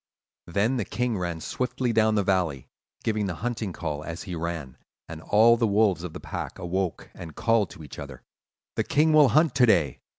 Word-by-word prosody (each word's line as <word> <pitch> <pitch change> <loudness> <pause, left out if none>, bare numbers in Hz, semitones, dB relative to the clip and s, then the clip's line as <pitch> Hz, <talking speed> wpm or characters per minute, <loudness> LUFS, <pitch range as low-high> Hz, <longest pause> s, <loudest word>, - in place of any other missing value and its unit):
"Then 105 +9 +1
the 115 - 0
king 120 +2 -2
ran 85 -3 -3
swiftly 125 +2 -2
down 110 -1 +3
the 100 - +2
valley, 90 -9 0 0.4
giving 105 -2 0
the 90 - -3
hunting 115 -5 -2
call 75 -4 -4
as 85 +1 -6
he 90 - -6
ran; 80 -5 -5 0.3
and 80 -1 -8
all 115 +6 +5
the 115 -1 +2
wolves 100 -4 +2
of 90 -3 -6
the - - -7
pack - - -6
awoke 90 -1 -3
and 80 -3 -10
called 115 -5 +2
to 80 - -11
each 75 - -10
other: 70 -3 -9 0.5
'The - - +2
king 155 +2 +3
will 150 -2 +7
hunt 155 +2 +3
to 125 -2 +4
day! 75 - +2
95 Hz, 200 wpm, -26 LUFS, 85-115 Hz, 0.5 s, will